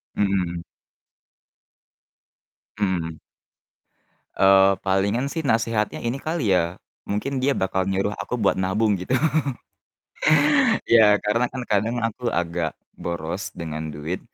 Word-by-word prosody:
Mhm. 90 -4 0 2.2
Mhm. 85 -5 -1 1.2
Eee, 95 0 +5
palingan 100 +8 0
sih 160 +1 -3
nasehatnya 115 -3 0
ini 120 +3 -2
kali 155 - -1
ya, 85 -1 +1 0.3
mungkin 130 +7 -2
dia 135 +2 +2
bakal 95 0 -1
nyuruh 95 +1 0
aku - - -3
buat 110 -5 +1
nabung 100 +2 +1
gitu. 90 +8 -3 1.7
Ya, 110 -3 +6
karena 115 +4 +2
kan 130 - -4
kadang 110 +3 +1
aku 115 +2 -2
agak 85 -4 -2 0.2
boros 85 +4 -5
dengan 80 -2 -5
duit. 75 +4 -5
100 Hz, 110 wpm, -23 LUFS, 90-115 Hz, 2.2 s, Ya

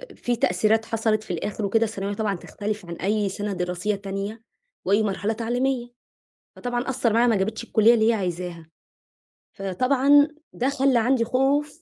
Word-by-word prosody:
في 245 0 -1
تأثيرات 225 0 +2
حصلت، 220 -1 0
في 185 - -7
الآخر 205 +4 -3
وكده، 225 +3 +2
الثانوية 205 -2 -3
طبعًا 210 -2 -1
بتختلف 210 +2 -5
عن 170 0 -6
أي 205 +2 0
سنة 205 +1 -4
دراسية 180 +3 -2
تانية 200 +2 -5 0.4
وأي 205 +3 +3
مرحلة 205 +2 -1
تعليمية. 240 +2 -1 0.7
فطبعًا 245 +1 -3
أثَّر 245 -4 +1
معاها، 235 +2 +4
ما 225 -3 +3
جابتش 215 +4 -2
الكُلية 230 +1 +4
اللي 220 0 +3
هي - - +5
عايزاها، 175 -4 -4 0.9
فطبعًا 265 - +3 0.3
ده 260 +3 0
خلَّى 270 -3 +2
عندي 240 0 +2
خوف 285 +5 0
220 Hz, 155 wpm, -24 LUFS, 200-245 Hz, 0.9 s, هي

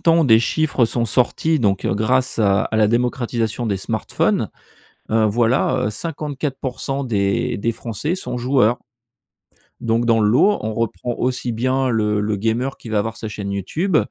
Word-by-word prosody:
temps 165 -1 +4
des 110 -4 +6
chiffres 130 +1 +1
sont 120 +1 -1
sortis, 130 +7 +1
donc, 100 -6 +1
heu, - - +1
grâce 125 +5 +1
à 100 -2 +3
à 110 - -2
la 110 -1 +4
démocratisation 120 -1 -1
des 100 - 0
smartphones, 95 - -1 0.6
heu, 110 0 +3
voilà, 120 +3 +2
heu, - - -1
54% 140 0 -4
des 100 -4 0
des 115 +4 0
Français 115 - -4
sont 185 -9 -4
joueurs. 125 -2 +2 1.0
Donc 115 +1 0
dans 115 -1 +4
le 105 - +3
lot 195 - +4
on 110 0 -3
reprend 115 +1 -2
aussi 125 -1 -1
bien 130 +3 0
le 105 -3 +1
le 105 0 -1
gamer 115 +6 -1
qui - - -11
va 110 -1 0
avoir 115 +2 -4
sa 110 - -6
chaîne 100 -1 -5
YouTube 155 - -1
115 Hz, 170 wpm, -20 LUFS, 110-130 Hz, 1.0 s, des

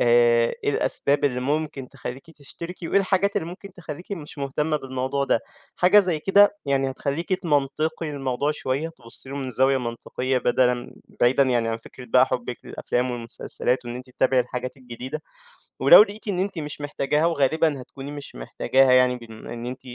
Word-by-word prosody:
آآ 120 -1 +4
إيه - - +2
الأسباب 140 0 +2
اللي 125 -3 +1
ممكن 145 -1 -2
تخلّيكِ 135 +6 -8
تشتركي 165 +3 -8
وإيه 200 - +4
الحاجات 195 +1 +1
اللي 160 - 0
ممكن 185 +2 -10
تخلّيكِ 175 +1 -8
مش 150 -5 -7
مهتمة 150 +3 -1
بالموضوع 135 0 -2
ده. 115 - +2 0.4
حاجة 185 +4 +6
زي 180 -5 0
كده 205 +3 +5
يعني 135 -1 +1
هتخلّيكِ 145 +7 -3
تمنطقي 155 -1 0
الموضوع 135 0 -1
شوية، 150 +1 -2
تبُصي 130 -4 -9
له 140 - -5
من 135 -2 -4
زاوية 130 +2 +3
منطقية 125 +2 -2
بدلًا 125 0 +1 0.3
بعيدًا 130 +3 +5
يعني 120 -3 +1
عن 115 - -1
فكرة 125 +2 -12
بقى 130 +1 +4
حُبِك 120 -1 -3
للأفلام 125 +1 -2
والمسلسلات 120 +1 -3
وإن 120 - -5
أنتِ 125 0 -10
تتابعي 130 0 +2
الحاجات 125 +1 -4
الجديدة، 130 +4 -7 0.6
ولو - - +10
لقيتِ 210 +1 -5
إن 185 - -1
أنتِ 190 -2 -2
مش 150 -1 -6
محتاجاها 145 +2 0
وغالبًا 155 -2 +1
هتكوني 135 +2 -9
مش 145 -1 -9
محتاجاها 130 - +2
يعني 125 0 +5
بما 115 -1 -10
إن 120 +1 -6
أنتِ 130 +1 -6
135 Hz, 170 wpm, -24 LUFS, 125-155 Hz, 0.6 s, ولو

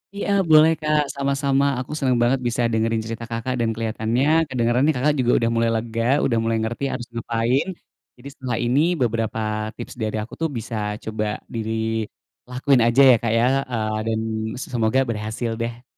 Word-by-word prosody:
Iya 200 - -3 0.2
boleh, 155 +1 +7
Kak, 150 -1 +2
sama-sama! 140 0 +1
Aku 130 - -6
seneng 130 -3 +2
banget 125 +2 +2
bisa 120 +1 -1
dengerin 110 0 0
cerita, 115 +1 -5
Kakak, 115 +3 -2
dan 115 -1 +1
keliatannya 120 +8 +1
kedengeran, 125 +2 +1
Kakak, 145 +4 +2
juga 125 -1 +2
udah 115 0 +1
mulai 115 0 +2
lega, 115 0 -3 0.2
udah 115 -3 +1
mulai 115 0 0
ngerti 120 +4 -4
harus 120 - -5
ngapain. 115 +6 0 0.5
Jadi 130 +3 -11
setelah 125 -4 -4
ini 130 +5 +3 0.2
beberapa 115 -1 0 0.4
tips - - -8
dari 110 0 -2
aku 115 - -12
tuh 165 - +1
bisa 115 +1 -5 0.3
coba 110 -1 -3 0.3
di 115 - -3 0.9
lakuin 130 0 +2
aja 125 +4 +4
ya, - - +7
Kak, 115 -2 0
ya, 115 - +3 0.3
eee, 110 -2 -1
dan 110 0 0 0.4
s 130 - -5
semoga 115 +1 +1
berhasil 110 +1 -3
deh. 120 +1 -4
120 Hz, 175 wpm, -22 LUFS, 115-135 Hz, 0.9 s, boleh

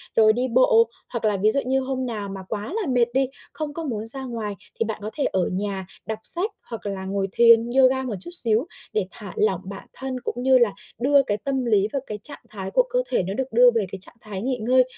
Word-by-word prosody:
rồi 215 -1 +6
đi 250 +3 0
bộ, 230 -2 +4 0.2
hoặc 235 -2 -3
là 210 -2 +2
ví 210 +3 +3
dụ 275 - +1
như 265 +1 +2
hôm 260 0 -2
nào 215 -5 -4
mà 195 -1 -7
quá 215 - -4
là 355 - -3
mệt 240 -2 +2
đi, 265 0 +2 0.3
không 305 -2 -4
có 330 - -5
muốn 225 -7 -3
ra 265 +3 +1
ngoài 225 -5 -4 0.2
thì 230 - +2
bạn 220 -1 -4
có 215 - -3
thể 290 - +1
ở 185 -2 0
nhà 190 0 -3 0.2
đọc 220 -1 -4
sách, 380 +6 +1 0.2
hoặc 230 -3 -7
là 195 -2 -4
ngồi 195 0 -1
thiền, 230 +1 +6
yoga 265 0 +4
một 235 -5 -3
chút 345 - -5
xíu 230 -4 +5 0.3
để 210 -3 +1
thả 200 -1 -9
lỏng 190 -4 +1
bản 195 +1 -9
thân 260 -1 -5
cũng - - -3
như 265 0 +6
là 240 -4 +4 0.3
đưa 275 +3 +4
cái 205 -5 -1
tâm 270 -2 -1
lý 210 -3 +3
và 275 - +1
cái 210 -1 -5
trạng 300 - -6
thái 195 -3 -6
của - - +4
cơ - - +1
thể 240 - +1
nó 190 +2 -3
được 265 +2 -3
đưa 245 +2 +7
về 220 -3 +2
cái 195 - -6
trạng 190 - -8
thái 200 -3 -6
nghỉ 255 +2 -1
ngơi, 255 +3 +4
230 Hz, 255 wpm, -24 LUFS, 205-260 Hz, 0.3 s, đưa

